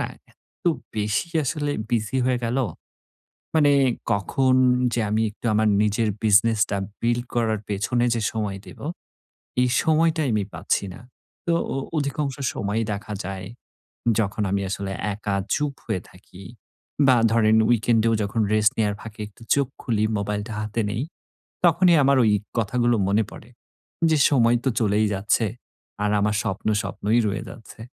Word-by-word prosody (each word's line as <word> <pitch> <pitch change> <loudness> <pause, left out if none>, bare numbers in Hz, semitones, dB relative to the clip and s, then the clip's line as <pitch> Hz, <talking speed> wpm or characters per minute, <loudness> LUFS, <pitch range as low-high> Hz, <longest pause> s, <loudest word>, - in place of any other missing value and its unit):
না - - -1 0.2
এত্ত - - -36 0.3
বেশি 105 +9 0 0.2
আসলে 145 +2 -1 0.2
বিজি 115 +2 0
হয়ে 130 -1 +1
গেল। 115 +3 -1 1.0
মানে 145 -2 +5 0.4
কখন 130 +6 +1 0.4
যে, 120 - 0
আমি 110 +1 +1
একটু 105 - -8
আমার 110 0 +3
নিজের 105 +1 +1 0.2
বিজনেসটা 110 0 +3 0.2
বিল্ড 120 +1 0
করার 110 -3 +1
পেছনে 105 +4 0
যে 115 - -1
সময় 105 -3 -3
দেব, - - -12 0.8
এই 125 - +3
সময়টাই 160 -2 +2
আমি 105 -1 +1
পাচ্ছি - - -1
না। - - -12 0.5
তো 170 - +3 0.2
অ - - -1 0.2
অধিকাংশ 140 -1 -1 0.2
সময়ই 105 +3 -1
দেখা 105 +1 -6
যায়, 95 -1 -5 0.7
যখন 105 0 0
আমি 100 0 0
আসলে 100 -1 -3 0.2
একা 100 -1 -3 0.2
চুপ 150 -1 -1
হয়ে 90 - -2
থাকি 90 0 -15 0.6
বা 130 - +6 0.2
ধরেন 110 -1 +4
weekend 115 -1 +3
এও 115 - +3
যখন 105 +3 -1
রেস্ট 110 0 +4
নেওয়ার 105 -2 +1
ফাঁকে 110 -1 -10
একটু 105 +3 -20
চোখ 140 -1 +1 0.2
খুলি, 110 -3 0
মোবাইলটা 105 +2 -3
হাতে 110 +2 -2
নেই। 110 +4 -2 0.6
তখনই 175 +1 +5
আমার 140 +1 +4
ঐ - - +4 0.3
কথাগুলো 120 +2 +1
মনে 105 +3 +3
পড়ে 115 - -12 0.6
যে, 160 - +4
সময় 120 -4 +4
তো - - +2
চলেই 105 0 +2
যাচ্ছে। 105 +3 +1 0.6
আর 105 - +1
আমার 105 +1 +1
স্বপ্ন, 95 +3 -3
স্বপ্নই 105 +3 0
রয়ে 100 0 -2
যাচ্ছে। 115 -2 -13
110 Hz, 150 wpm, -23 LUFS, 105-125 Hz, 1.0 s, বা